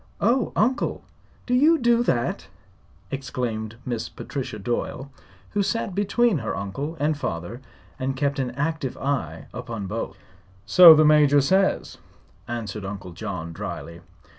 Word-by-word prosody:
"Oh, 235 +3 +2
Uncle! 250 +5 0 0.4
Do 250 - -1
you 305 +6 +5
do 240 -3 +3
that?" 120 - -1 0.6
exclaimed 120 -5 -4
Miss 120 -3 -3
Patricia 130 -6 -6
Doyle, 120 +5 -3 0.4
who 205 - +1
sat 200 -1 -1
between 205 0 +2
her - - -3
uncle 140 - -4
and 150 +2 +1
father 105 - -5 0.4
and 130 +1 -2
kept 140 0 0
an 130 -2 -1
active 145 -2 -2
eye 125 - -2
upon 115 -4 -5
both. 110 +4 -4 0.5
"So 170 - +10
the 155 0 +5
Major 150 -1 +6
says," 190 +8 +1 0.5
answered 110 -4 -5
Uncle 95 -2 -6
John, 90 -3 -6
dryly. 85 +1 -7
135 Hz, 135 wpm, -24 LUFS, 110-170 Hz, 0.6 s, So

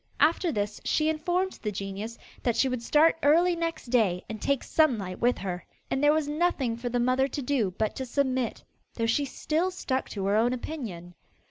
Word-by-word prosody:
After 330 +2 +3
this 205 -3 -3
she 310 0 +2
informed 355 +4 -1
the 210 - -2
genius 200 +3 -5 0.2
that 240 -2 +1
she 270 - +3
would 255 -2 -2
start 310 +6 +4
early 340 +5 +4
next 330 -7 -3
day 195 -8 +2
and 220 -1 -6
take 280 -2 +1
Sunlight 220 - +1
with 245 +1 +2
her. 180 -2 -4 0.3
And 270 - 0
there 290 - +6
was 310 -1 +1
nothing 295 -6 0
for 240 +1 -4
the 245 0 0
mother 255 +2 +2
to 280 - -4
do 240 -9 0
but 215 -1 0
to 265 - -3
submit, 260 -2 -1 0.3
though 230 - 0
she 255 +6 +2
still 320 +6 -1
stuck 265 -8 -2
to 195 -2 -4
her 200 +1 +2
own 235 +3 +3
opinion. 220 - -6
255 Hz, 200 wpm, -28 LUFS, 220-305 Hz, 0.3 s, there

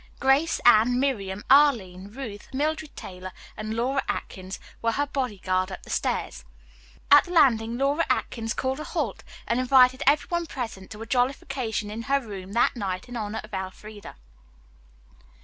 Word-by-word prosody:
Grace, 275 +4 +3
Anne, 240 +1 +6
Miriam, 205 -8 -1
Arline, 225 -10 +4
Ruth, 215 -2 -8
Mildred 305 +2 -2
Taylor 185 0 -8 0.2
and 215 +1 -4
Laura 260 +4 0
Atkins 190 +1 -5 0.2
were 230 0 +1
her 285 +5 0
body 260 -7 -3
guard 185 0 -1
up 190 - -8
the - - -10
stairs. - - -2 0.7
At 290 0 +8
the 355 - -9
landing 235 -8 +3
Laura 280 +5 +2
Atkins 225 -1 -1
called 265 +2 -2
a - - -4
halt - - -3 0.2
and 235 - 0
invited 255 0 +5
every 290 +1 +4
one 345 -1 -1
present 225 -9 -6
to 220 +1 -8
a - - -8
jollification 245 -3 -1
in 220 +2 -5
her 275 0 +4
room 200 -6 -8
that 235 - +3
night 190 -2 -4
in 245 - -7
honor 215 -1 -3
of 215 0 -14
Elfreda. 200 +2 -7
235 Hz, 165 wpm, -26 LUFS, 205-275 Hz, 0.7 s, At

